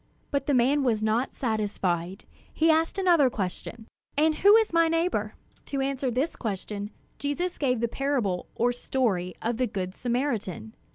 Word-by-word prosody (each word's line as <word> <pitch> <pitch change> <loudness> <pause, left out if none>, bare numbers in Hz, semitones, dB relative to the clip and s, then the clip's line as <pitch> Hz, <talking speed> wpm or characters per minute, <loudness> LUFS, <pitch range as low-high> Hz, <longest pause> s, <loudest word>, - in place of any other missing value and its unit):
But 280 -2 -1
the 285 - +3
man 270 +4 +3
was 225 -4 +1
not 220 +4 +1
satisfied. 200 -6 -2 0.3
He 325 +1 +3
asked 320 +3 +1
another 345 -8 +4
question: 205 +2 -5 0.3
"And 310 +1 +4
who 405 +6 +6
is 445 -5 +3
my 335 0 +5
neighbor?" 330 +2 0 0.3
To 275 - -2
answer 270 -1 -1
this 260 +7 -1
question, 205 -1 -4 0.3
Jesus 335 +6 -2
gave 250 -5 +1
the 235 - +2
parable 235 -9 -1
or 245 +1 +2
story 220 -8 -1
of 230 0 -1
"The 255 0 +1
Good 185 -3 -4
Samaritan." 235 - -2
250 Hz, 160 wpm, -27 LUFS, 210-290 Hz, 0.3 s, who